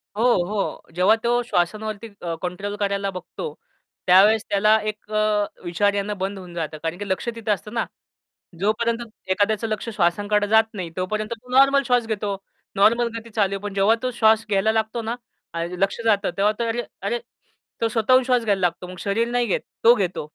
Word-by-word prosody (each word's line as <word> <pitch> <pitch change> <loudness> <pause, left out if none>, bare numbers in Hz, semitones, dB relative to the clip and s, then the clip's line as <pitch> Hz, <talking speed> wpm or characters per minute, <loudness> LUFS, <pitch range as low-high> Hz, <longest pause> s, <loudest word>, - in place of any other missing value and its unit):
हो, 225 - 0 0.2
हो. 200 -3 -4
जेव्हा 190 +5 +5
तो 240 +1 +2
श्वासांवरती 215 +2 -2
अ, 170 -1 -3
कंट्रोल 195 +3 -4
करायला 200 -1 0
बघतो, 315 - -7 0.5
त्यावेळेस 205 +4 +6
त्याला 210 +2 +4
एक 215 0 -9
अ, 215 -1 +2 0.2
विचार 200 +4 +1
येणे 205 +1 -1
बंद 195 +1 -3
होऊन 180 -2 -10
जातं. 155 -2 -4
कारण 165 +2 -2
की 205 0 -6
लक्ष 190 +5 -1
तिथं 220 -2 -2
असतं 210 +3 -7
ना, 230 - 0 0.8
जोपर्यंत 230 +3 0 0.3
एखाद्याचं 210 +3 +1
लक्ष 215 +2 -3
श्वासांकडे 205 +3 +1
जात 220 +1 +6
नाही, 180 -4 -5
तोपर्यंत 215 +4 -2
तो 250 - -17
नॉर्मल 275 0 +6
श्वास 245 -2 +2
घेतो. 205 -2 -2 0.4
नॉर्मल 235 +4 +4
गती 230 0 -12
चालू 200 -2 +1
आहे, 195 - -4
पण 205 -1 -5
जेव्हा 200 +3 +4
तो 255 - 0
श्वास 225 -2 +3
घ्यायला 205 +2 +2
लागतो 220 +1 -1
ना, 225 +2 -2 0.4
ल 170 +2 -3
लक्ष 195 +4 0
जातं 205 -4 +2
तेव्हा 205 +2 +3
तो 235 - -5
तर 230 +1 -1 0.3
अरे 480 - 0 0.6
तो 230 - +2
स्वतःहून 245 +4 +3
श्वास 250 -2 +2
घ्यायला 200 -3 +1
लागतो 180 0 -1
मग 185 - -9
शरीर 215 +5 0
नाही 245 -1 +1
घेत, 195 - 0 0.2
तो 235 +1 +8
घेतो. 190 -5 -1
210 Hz, 190 wpm, -23 LUFS, 195-225 Hz, 0.8 s, तो